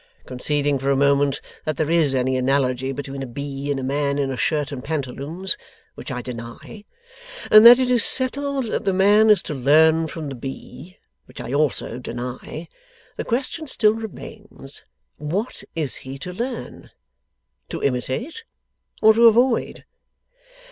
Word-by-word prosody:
Conceding 145 Hz, +2 st, -1 dB
for 135 Hz, +1 st, -2 dB
a 140 Hz, -, +3 dB
moment 140 Hz, 0 st, +2 dB, 0.2 s
that 155 Hz, -3 st, -3 dB
there 155 Hz, 0 st, -1 dB
is 155 Hz, -5 st, +2 dB
any 130 Hz, 0 st, 0 dB
analogy 130 Hz, 0 st, 0 dB
between 135 Hz, 0 st, -6 dB
a 135 Hz, -, -5 dB
bee, 140 Hz, +2 st, -6 dB
and 140 Hz, -1 st, -1 dB
a -, -, -5 dB
man 140 Hz, +1 st, -1 dB
in 140 Hz, -2 st, -1 dB
a -, -, -3 dB
shirt 150 Hz, +3 st, -1 dB
and 130 Hz, -3 st, -6 dB
pantaloons 155 Hz, +5 st, -3 dB, 0.3 s
(which -, -, -9 dB
I 125 Hz, -2 st, -4 dB
deny), 120 Hz, -, -9 dB, 0.7 s
and 215 Hz, 0 st, +9 dB
that 240 Hz, +1 st, +10 dB
it 255 Hz, -1 st, 0 dB
is 240 Hz, -2 st, +6 dB
settled 275 Hz, +1 st, +1 dB
that 220 Hz, -, -3 dB
the 195 Hz, -, +1 dB
man 205 Hz, +3 st, +5 dB
is 210 Hz, -, +5 dB
to -, -, -5 dB
learn 160 Hz, +4 st, +4 dB
from 155 Hz, -1 st, -6 dB
the -, -, -6 dB
bee 135 Hz, +7 st, -9 dB, 0.3 s
(which -, -, -13 dB
I 120 Hz, -, -5 dB
also 140 Hz, -4 st, 0 dB
deny), 125 Hz, +6 st, -7 dB, 0.5 s
the -, -, -4 dB
question 275 Hz, +6 st, -3 dB
still 215 Hz, -5 st, +2 dB
remains, 215 Hz, -8 st, -9 dB, 0.4 s
what 180 Hz, -, -4 dB
is 155 Hz, -6 st, -3 dB
he 135 Hz, +1 st, -8 dB
to 180 Hz, +6 st, -7 dB
learn? 240 Hz, +6 st, -6 dB, 0.8 s
To -, -, -5 dB
imitate? 140 Hz, -, -2 dB, 0.6 s
Or 220 Hz, 0 st, +8 dB
to 230 Hz, +1 st, +6 dB
avoid? 235 Hz, +2 st, +2 dB
145 Hz, 160 wpm, -22 LUFS, 135-210 Hz, 0.8 s, that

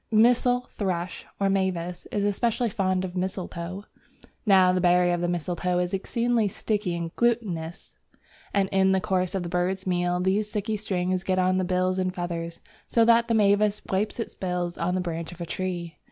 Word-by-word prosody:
Missel 245 Hz, +2 st, +4 dB
thrush 185 Hz, -3 st, -3 dB
(or 200 Hz, -, +2 dB
mavis) 185 Hz, -3 st, -1 dB
is 205 Hz, -, 0 dB
especially 230 Hz, +3 st, 0 dB
fond 185 Hz, -1 st, 0 dB
of 180 Hz, -, -6 dB
the 180 Hz, -, -2 dB
mistletoe. 185 Hz, 0 st, -4 dB, 0.6 s
Now 185 Hz, -2 st, +6 dB
the 185 Hz, -, +1 dB
berry 180 Hz, 0 st, +4 dB
of 175 Hz, 0 st, 0 dB
the 175 Hz, -, 0 dB
mistletoe 175 Hz, +1 st, -1 dB
is 180 Hz, +1 st, -1 dB
exceedingly 230 Hz, +3 st, +1 dB
sticky 200 Hz, -2 st, -2 dB
and 170 Hz, -1 st, -5 dB
glutinous, 200 Hz, -9 st, -1 dB, 0.5 s
and 195 Hz, -1 st, +2 dB
in 190 Hz, 0 st, +3 dB
the 190 Hz, -, +3 dB
course 185 Hz, -1 st, -1 dB
of 190 Hz, -, -1 dB
the -, -, -4 dB
bird's 180 Hz, +2 st, -1 dB
meal 175 Hz, -1 st, 0 dB
these 195 Hz, +3 st, +1 dB
sticky 210 Hz, +1 st, -2 dB
strings 185 Hz, -3 st, -1 dB
get 185 Hz, -1 st, 0 dB
on 185 Hz, 0 st, +3 dB
to -, -, +1 dB
the 185 Hz, -, 0 dB
bill 185 Hz, +1 st, +1 dB
and 185 Hz, 0 st, -1 dB
feathers, 170 Hz, -1 st, -4 dB, 0.3 s
so 230 Hz, -1 st, +3 dB
that 235 Hz, 0 st, +5 dB
the 230 Hz, -, +2 dB
mavis 210 Hz, 0 st, +3 dB
wipes 210 Hz, +4 st, 0 dB
its 230 Hz, -, -4 dB
bill 180 Hz, -2 st, -2 dB
on 180 Hz, +2 st, 0 dB
the 185 Hz, -, 0 dB
branch 170 Hz, -1 st, -4 dB
of 175 Hz, -, -12 dB
a 170 Hz, -, -3 dB
tree. 175 Hz, -2 st, -4 dB
185 Hz, 195 wpm, -26 LUFS, 175-205 Hz, 0.6 s, Now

